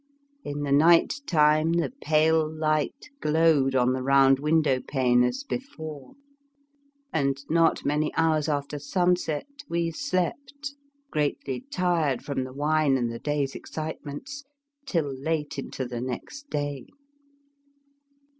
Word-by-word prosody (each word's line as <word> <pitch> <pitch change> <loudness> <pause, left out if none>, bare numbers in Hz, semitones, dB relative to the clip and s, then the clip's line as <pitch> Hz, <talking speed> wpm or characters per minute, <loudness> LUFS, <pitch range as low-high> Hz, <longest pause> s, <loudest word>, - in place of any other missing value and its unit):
In 145 0 -4
the 140 - -2
night 165 - +5
time 155 0 +4
the 170 +7 0
pale 155 0 +3
light 155 - -1
glowed 150 - +3
on 125 0 +3
the 130 - -2
round 135 0 +5
window 150 -3 +2
pane 125 -3 +2
as 125 - -1
before, 160 - -7 1.0
and 140 -3 +1
not 165 0 +3
many 150 +2 +1
hours 160 -2 +2
after 145 0 -2
sunset 175 0 0 0.2
we 170 0 0
slept, 280 - -3 0.4
greatly 145 - -2
tired 170 - 0
from 135 -3 -2
the 130 - -9
wine 150 -1 +2
and 120 -2 -1
the 115 - -6
day's 145 -2 -1
excitements, 160 - -6 0.4
till 165 - +1
late 150 +1 -2
into 130 -1 -5
the 120 -1 -5
next 130 - -6
day. 145 - -3
150 Hz, 125 wpm, -26 LUFS, 140-165 Hz, 1.0 s, night